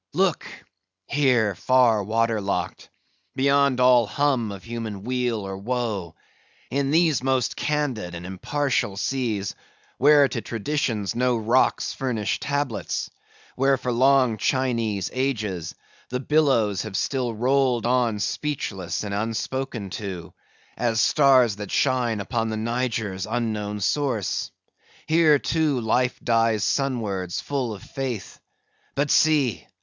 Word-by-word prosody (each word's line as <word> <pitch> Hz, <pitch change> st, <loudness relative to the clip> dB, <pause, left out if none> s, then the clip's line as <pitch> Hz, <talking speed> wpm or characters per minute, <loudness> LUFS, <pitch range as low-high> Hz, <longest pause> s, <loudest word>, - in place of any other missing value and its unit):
Look! -, -, +1 dB, 0.6 s
here, 125 Hz, -7 st, +2 dB
far 115 Hz, +1 st, +3 dB
water 115 Hz, +1 st, 0 dB
locked; 95 Hz, -3 st, -3 dB, 0.5 s
beyond 140 Hz, -1 st, +3 dB
all 125 Hz, -3 st, +5 dB
hum 130 Hz, -3 st, 0 dB
of 100 Hz, -1 st, -9 dB
human 115 Hz, -4 st, -6 dB
weal 125 Hz, -2 st, -1 dB
or 95 Hz, 0 st, -5 dB
woe; 105 Hz, -5 st, -3 dB, 0.6 s
in 140 Hz, 0 st, 0 dB
these 160 Hz, -2 st, +3 dB
most 130 Hz, -2 st, 0 dB
candid 130 Hz, -12 st, -2 dB
and 85 Hz, +1 st, -7 dB
impartial 105 Hz, +2 st, -1 dB
seas; 110 Hz, -5 st, -2 dB, 0.5 s
where 145 Hz, +1 st, +6 dB
to 120 Hz, -, -4 dB
traditions 115 Hz, -3 st, -2 dB
no 125 Hz, 0 st, +2 dB
rocks 115 Hz, +4 st, +1 dB
furnish 115 Hz, -6 st, -2 dB
tablets; 140 Hz, -5 st, -2 dB, 0.4 s
where 135 Hz, +1 st, +3 dB
for 125 Hz, 0 st, -3 dB
long 130 Hz, -1 st, +3 dB
Chinese 115 Hz, -7 st, 0 dB
ages, 110 Hz, -, -2 dB, 0.3 s
the 125 Hz, -, -2 dB
billows 130 Hz, -9 st, +2 dB
have 105 Hz, -3 st, -4 dB
still 125 Hz, -4 st, -1 dB
rolled 125 Hz, 0 st, +1 dB
on 120 Hz, -3 st, +2 dB
speechless 100 Hz, -, -3 dB
and 100 Hz, -1 st, -4 dB
unspoken 115 Hz, 0 st, -3 dB
to, 95 Hz, -5 st, -6 dB, 0.4 s
as 115 Hz, -2 st, 0 dB
stars 130 Hz, -6 st, +4 dB
that 105 Hz, -2 st, -6 dB
shine 125 Hz, -5 st, +1 dB
upon 115 Hz, +2 st, -2 dB
the 110 Hz, -, -3 dB
Niger's 110 Hz, -4 st, -2 dB
unknown 110 Hz, -3 st, -2 dB
source; 120 Hz, -, -1 dB, 0.6 s
here, 160 Hz, -2 st, +5 dB
too, 150 Hz, -2 st, 0 dB
life 125 Hz, +2 st, 0 dB
dies 115 Hz, -2 st, +2 dB
sunwards 105 Hz, -11 st, -1 dB
full 135 Hz, -5 st, -2 dB
of 100 Hz, -, -13 dB
faith; 130 Hz, -7 st, -5 dB, 0.6 s
but 145 Hz, +1 st, 0 dB
see! 140 Hz, -, +2 dB
120 Hz, 125 wpm, -24 LUFS, 105-135 Hz, 0.6 s, where